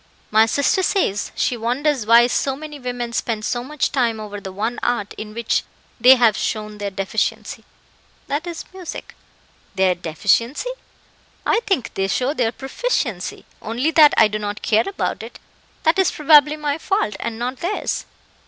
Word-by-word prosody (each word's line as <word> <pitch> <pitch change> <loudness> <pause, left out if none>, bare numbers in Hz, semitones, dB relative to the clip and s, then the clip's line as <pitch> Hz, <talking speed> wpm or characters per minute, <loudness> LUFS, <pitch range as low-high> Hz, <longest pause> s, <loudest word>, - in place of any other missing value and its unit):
"My 220 +1 +5
sister 285 +10 +2
says, 355 - 0
she 250 - 0
wonders 250 +1 -1
why 235 +1 +7
so 265 +2 0
many 300 0 -9
women 245 -2 -4
spend 220 -2 -2
so 240 0 -1
much 295 +2 -2
time 235 -5 0
over 205 -1 -7
the 190 - -7
one 220 +5 -3
art 235 -4 -1
in 215 0 -8
which 235 -1 0 0.4
they 250 +3 +8
have 235 -4 +4
shown 215 -1 -3
their 205 -1 -2
deficiency 195 +2 -3 0.6
that 295 +5 -3
is, 340 -1 -6
music." 370 -3 -8 0.6
"Their 190 -1 +3
deficiency? 205 - 0 0.7
I 445 - +3
think 350 - 0
they 195 0 -1
show 255 +7 0
their 240 -6 0
proficiency, 265 - -3 0.2
only 245 +8 -1
that 305 -2 +6
I 220 - +7
do 215 0 -4
not 205 0 -5
care 220 - +2
about 390 - -3
it; - - -10 0.5
that 320 +4 +3
is 380 - +4
probably 300 0 +5
my 295 0 -2
fault, 385 - 0
and 230 -1 -4
not 250 +3 -3
theirs." 365 +8 -3
240 Hz, 165 wpm, -21 LUFS, 215-295 Hz, 0.7 s, they